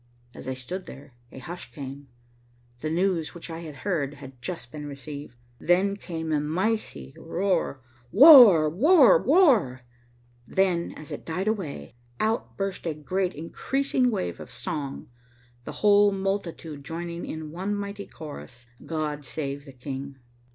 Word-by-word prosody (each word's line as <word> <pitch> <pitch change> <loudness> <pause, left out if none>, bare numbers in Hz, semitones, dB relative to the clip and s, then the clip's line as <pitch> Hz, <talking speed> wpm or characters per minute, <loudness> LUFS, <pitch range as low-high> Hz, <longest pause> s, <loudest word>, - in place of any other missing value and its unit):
As - - -10
I 130 - -2
stood 180 +9 -6
there, 135 -1 -12 0.2
a - - -12
hush 145 -1 -8
came. 140 +1 -8 0.7
The 155 - -3
news 175 -1 0
which 170 0 -8
I 165 - -5
had 160 -3 -8
heard 150 -8 -1
had 135 -3 -12
just 120 -2 -6
been 150 +1 -7
received. 140 -2 -8 0.2
Then 190 +3 +2
came 160 -5 -5
a 150 - +2
mighty 155 - -2
roar, 170 -5 -1 0.3
"War, 230 - +10
War, 270 - +6
War." 255 - +4 0.7
Then, 185 -3 +1
as 155 - -10
it - - -6
died 180 +5 -3
away, 165 - -3 0.3
out 220 +1 -1
burst 195 -3 -3
a 160 - -2
great 180 +5 -2
increasing 255 - 0
wave 90 - -3
of - - -10
song, 140 -3 -5 0.6
the - - -5
whole 205 0 +6
multitude 190 -6 -3
joining 170 +2 -5
in 155 -1 -6
one 190 +5 -2
mighty 200 0 -5
chorus, 145 -6 -10 0.2
"God 155 -2 -3
save 140 +2 -5
the 140 - -11
King." 135 +2 -7
165 Hz, 145 wpm, -26 LUFS, 140-195 Hz, 0.7 s, War